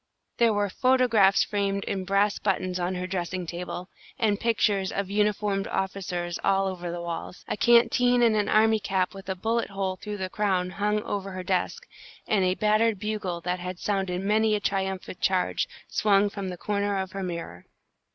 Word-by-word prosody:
There 235 -1 +5
were 205 -1 +1
photographs 230 -3 +4
framed 200 -1 -1
in 190 -2 -3
brass 200 +2 +2
buttons 185 -2 -1
on 180 +1 -1
her 180 0 -3
dressing 185 -1 -3
table, 175 +1 -5 0.3
and 210 -4 +1
pictures 210 -4 +1
of 200 -1 -3
uniformed 205 -1 +1
officers 180 -3 -3
all 195 0 +3
over 180 -2 -4
the 170 0 -5
walls. 170 +1 -6
A - - -1
canteen 240 +2 +4
and 225 -2 +4
an 210 -1 +1
army 220 0 +4
cap 190 -2 -1
with 195 0 -10
a 190 - -1
bullet 225 +5 -1
hole 195 -1 -2
through 210 +2 -6
the 190 -1 -3
crown, 185 -2 0
hung 210 +2 0
over 195 -1 -4
her 185 0 -5
desk, 190 - -1 0.4
and 205 -3 +2
a 185 0 +2
battered 215 +1 +2
bugle, 200 -4 -3
that 180 +1 -2
had 180 0 -5
sounded 190 -2 -1
many 215 +1 +3
a - - 0
triumphant 190 -2 -3
charge, 185 -1 +1 0.2
swung 205 -1 +3
from 195 -2 -4
the 180 - -6
corner 200 +1 -1
of 190 -1 -3
her 195 0 -5
mirror. 170 - -6
195 Hz, 180 wpm, -26 LUFS, 185-210 Hz, 0.4 s, There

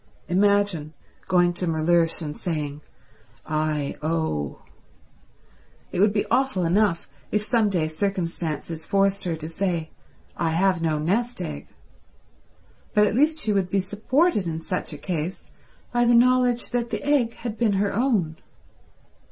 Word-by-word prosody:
Imagine 195 -4 +2 0.3
going 175 -1 +3
to 180 +1 -2
Mellersh 165 +1 +2
and 150 -1 -5
saying, 150 -4 -3 0.6
"I 155 -2 -1
owe." 155 - -2 1.3
It - - -3
would 205 +2 +5
be 205 0 0
awful 260 -9 +2
enough 180 0 +2 0.2
if 210 0 +1
some 220 -1 +2
day 170 -5 0
circumstances 165 -2 -3
forced 195 0 +2
her 170 -2 -1
to 155 0 -6
say, 165 -1 -2 0.4
"I 165 -2 0
have 180 0 +2
no 160 -2 +1
nest 220 +11 0
egg," 70 -1 -5 1.3
but 210 0 +6
at 205 - 0
least 300 +6 +3
she 220 -9 0
would 190 -2 +1
be 195 - +1
supported 210 - +1
in 160 -1 -3
such 180 +2 -4
a 150 - -7
case 170 +1 -4 0.5
by 240 0 +3
the 240 0 +5
knowledge 245 0 +3
that 240 -1 -1
the - - -3
egg 270 -6 +2
had 230 -3 -5
been 225 -4 +3
her 200 +1 +1
own. 200 -9 +1
185 Hz, 145 wpm, -24 LUFS, 160-215 Hz, 1.3 s, but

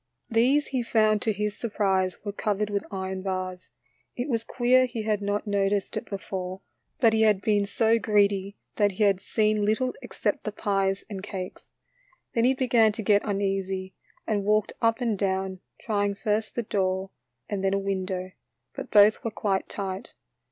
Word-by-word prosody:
These 255 +6 +3
he 260 -2 0
found 215 -2 +2
to 220 - +1
his 210 0 -2
surprise 195 -5 0
were 205 - -2
covered 210 0 -1
with 200 -1 -1
iron 190 -1 -4
bars. 185 -1 -4 0.5
It 250 +4 -3
was 230 -3 0
queer 255 +2 +3
he 235 -3 -4
had 210 -1 0
not 205 +1 -1
noticed 200 -1 0
it - - -4
before, 190 -1 -5 0.4
but 230 -3 +5
he 220 - +2
had 215 -3 +4
been 205 0 +1
so 225 +2 +2
greedy 200 -2 +1 0.2
that 205 -2 +3
he 210 - 0
had 195 -2 +3
seen 215 0 +1
little 220 +5 +1
except 205 - -2
the 215 - -3
pies 195 -2 0
and 200 -3 -6
cakes. 190 -2 -7 0.6
Then 230 0 +2
he 260 +1 +4
began 240 -4 +4
to 220 - -5
get 205 0 +4
uneasy, 195 -2 -2 0.3
and 210 -2 0
walked 210 +1 +2
up 230 +2 +2
and 230 -3 +1
down, 190 -1 -1 0.2
trying 205 -2 0
first 215 +1 -1
the 240 - -1
door 190 -2 -1 0.4
and 200 -2 -3
then 195 0 +2
a - - +2
window, 190 -1 -3 0.4
but - - -7
both 210 +1 +6
were 230 - -1
quite 200 -3 -1
tight. 195 -1 -5
205 Hz, 175 wpm, -26 LUFS, 195-220 Hz, 0.6 s, both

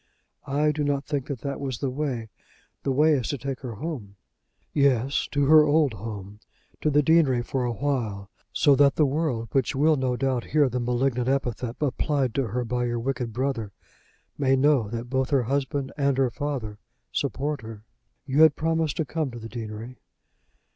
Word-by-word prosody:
"I 150 +2 +2
do 150 0 -2
not 140 -1 0
think 145 -4 -2
that 135 -6 -5
that 140 0 -4
was 135 -4 -3
the 135 0 -2
way. 130 -5 -3 0.5
The 135 - -1
way 150 +4 +4
is 130 -5 0
to 145 - -2
take 135 +1 -4
her 125 -4 -6
home." 115 -7 -6 0.6
"Yes; 140 -2 +2
to 145 -1 +2
her 155 +2 +8
old 150 -3 +3
home, 105 -1 -7 0.4
to 155 - +2
the 150 0 +3
deanery 140 -6 +4
for 125 +1 -2
a 120 - 0
while; 115 -7 -2 0.2
so 145 - +4
that 140 -2 +5
the 155 - +4
world, 135 -6 -1
which 135 -3 +1
will 150 +3 +3
no 130 -2 0
doubt 130 -1 0
hear 145 -3 +3
the 125 +1 -2
malignant 125 +1 0
epithet 125 -3 -1
applied 140 -3 0
to 135 -3 0
her 125 +3 -2
by 125 +1 -1
your 120 0 -1
wicked 120 -1 -2
brother, 120 -4 -2 0.7
may 135 -1 +3
know 135 -5 +3
that 115 +2 -5
both 130 0 0
her 135 -3 +2
husband 135 +2 -1
and 140 -2 +1
her 130 -2 +2
father 125 -7 -4 0.3
support 145 +1 -2
her. 110 -1 -9 0.4
You 140 +3 +2
had 160 -2 +7
promised 160 -2 0
to 160 - 0
come 155 +1 -2
to 120 - -9
the 115 -1 -8
deanery." 115 +1 -7
135 Hz, 190 wpm, -25 LUFS, 120-145 Hz, 0.7 s, her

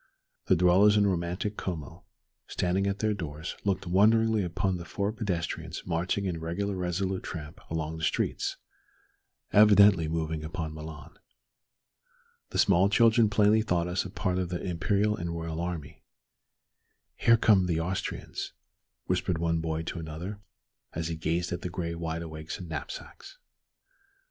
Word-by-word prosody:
The - - +5
dwellers 95 +5 +5
in 105 - +4
romantic 90 +2 -1
Como, 80 -6 -5 0.4
standing 95 +2 0
at 100 0 -1
their 110 0 +1
doors, 80 -4 -5
looked 100 -2 0
wonderingly 110 +4 +4
upon 95 +1 -1
the 85 - -7
four 100 +5 -2
pedestrians 85 -6 -3
marching 90 +3 -1
in 90 -3 -2
regular 95 +5 -2
resolute 95 +1 -1
tramp 75 -3 -7
along 80 0 -3
the 80 - -7
streets, - - 0 1.0
evidently 100 -5 +7
moving 80 -1 -2
upon 80 -1 -4
Milan. 80 -2 -9 1.3
The - - -4
small 95 0 +4
children 115 +1 +5
plainly 105 +1 +4
thought 90 -5 0
us 90 +1 0
a 95 - -7
part 90 -1 -1
of 90 -2 -2
the 90 -1 -3
imperial 100 +4 +1
and 85 -5 -4
royal 80 0 -4
army. 85 -4 -5 1.1
"Here 115 0 +5
come 100 -5 +4
the 85 -2 0
Austrians," 90 +3 -4 0.5
whispered 90 - 0
one 85 0 0
boy 80 0 -2
to 85 - -5
another, 85 +6 -6 0.5
as 80 0 -3
he 85 - -2
gazed 85 +2 -1
at 85 - -3
the 90 - -4
gray 85 -1 -3
wide 85 0 -3
awakes 80 -1 -6
and 90 - -8
knapsacks. 80 - -7
90 Hz, 150 wpm, -29 LUFS, 80-100 Hz, 1.3 s, evidently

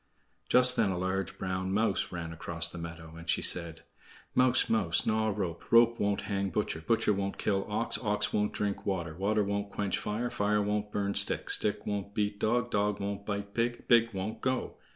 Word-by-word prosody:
Just 125 0 +6
then 105 -3 +3
a 95 - -2
large 95 +1 -2
brown 95 0 -3
mouse 105 -1 0
ran 85 -2 -5
across 80 0 +1
the 85 - -8
meadow, 85 -1 -8
and 85 +1 -10
she - - +2
said: 85 -2 +3 0.5
"Mouse, 125 0 +4
mouse, 100 -7 +2
gnaw 110 0 +1
rope; 95 -5 -4
Rope 115 0 +5
won't 100 -1 0
hang 100 -1 -2
butcher; 80 -2 -2
Butcher 115 +4 +1
won't 100 0 -3
kill 100 -2 -1
ox; 110 +2 -1
Ox 105 -2 0
won't 105 0 +1
drink 100 -1 -3
water; 85 -5 -2
Water 105 +4 +1
won't 100 0 -2
quench 100 -2 -2
fire; 115 +4 -3
Fire 105 +1 +1
won't 105 0 -2
burn 100 -1 -1
stick; - - +1
Stick 105 -1 +2
won't 100 -1 -4
beat 105 -1 -1
dog; 120 +3 0
Dog 105 0 0
won't 100 0 -5
bite 100 -1 -4
pig; 120 +1 -2
Pig 115 -1 +5
won't 100 +2 -5
go. 130 -1 -2
100 Hz, 195 wpm, -30 LUFS, 95-110 Hz, 0.5 s, Just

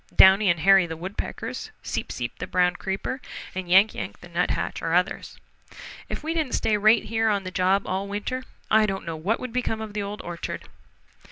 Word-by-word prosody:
Downy 190 +1 +7
and 170 -2 +2
Hairy 195 0 +6
the 160 -1 -6
Woodpeckers, 185 +4 -5
Seep - - -3
Seep 120 -1 -5
the - - -4
Brown 180 -1 +2
Creeper 195 +9 -3 0.3
and 185 -1 -5
Yank 195 +4 +6
Yank 100 +1 -6
the 175 - -12
Nuthatch 175 +1 -1
are 165 +1 0
others. 180 0 0 0.7
If - - -5
we 320 +1 -1
didn't 315 -6 -1
stay 215 - +1
right 215 +2 +5
here 225 0 +1
on 200 -2 +1
the 185 - -5
job 185 +2 +2
all 190 +2 -2
winter, 210 +6 -3 0.3
I 215 0 +5
don't 195 -1 -3
know 165 -1 -4
what 185 +9 -1
would 255 -2 -6
become 245 -3 -1
of 220 -1 -6
the 210 - -2
Old 200 +1 -5
Orchard." 175 -1 -5
195 Hz, 200 wpm, -25 LUFS, 180-215 Hz, 0.7 s, Downy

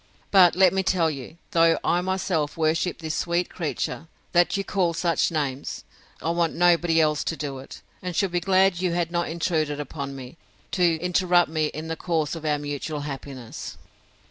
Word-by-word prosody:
But 185 -4 +6
let 185 0 +5
me 190 - +2
tell 175 -4 +2
you, 140 +3 -8
though 165 -3 +4
I 175 - +2
myself 180 -5 -1
worship 160 +2 +1
this 160 -1 -3
sweet 175 +1 0
creature, 165 -1 -3 0.2
that 175 +3 +3
you 195 - -1
call 180 -4 0
such 170 0 +1
names, 145 -4 -3 0.4
I 165 - +1
want 170 -1 0
nobody 170 -1 +4
else 150 -1 +2
to 165 - -2
do 140 -3 -4
it; 135 - -11 0.2
and 180 -2 -4
should 195 0 +1
be 175 - +1
glad 190 0 +3
you 180 -2 0
had 170 -1 -1
not 175 0 -1
intruded 155 -3 -1
upon 140 -1 -5
me, 130 +3 -10 0.3
to 175 -3 +3
interrupt 175 0 +2
me 155 -1 +1
in 155 +2 -6
the 165 - -3
course 160 -3 -1
of 165 -2 -6
our 150 -1 +2
mutual 145 +1 -4
happiness. 135 -4 -7
165 Hz, 185 wpm, -25 LUFS, 150-175 Hz, 0.4 s, But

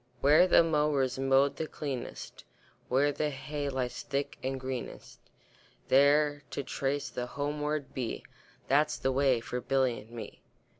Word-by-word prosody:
Where 150 +6 +6
the 170 - +6
mowers 150 -5 +1
mow 135 +1 +4
the 160 +2 -5
cleanest, 135 -6 -6 0.5
Where 140 +3 +3
the 150 +1 -1
hay 145 +1 -4
lies 125 -2 -3
thick 140 0 -3
and 130 0 -3
greenest, 130 -1 -6 0.7
There 145 +2 +4
to 140 - -4
trace 140 +2 -2
the 125 0 -4
homeward 150 +1 -3
bee, 125 -3 -4 0.4
That's 150 +3 +2
the 135 - 0
way 130 -3 +2
for 125 +2 -4
Billy 130 -1 +1
and 110 - -15
me. 115 -3 -9
140 Hz, 145 wpm, -30 LUFS, 130-145 Hz, 0.7 s, Where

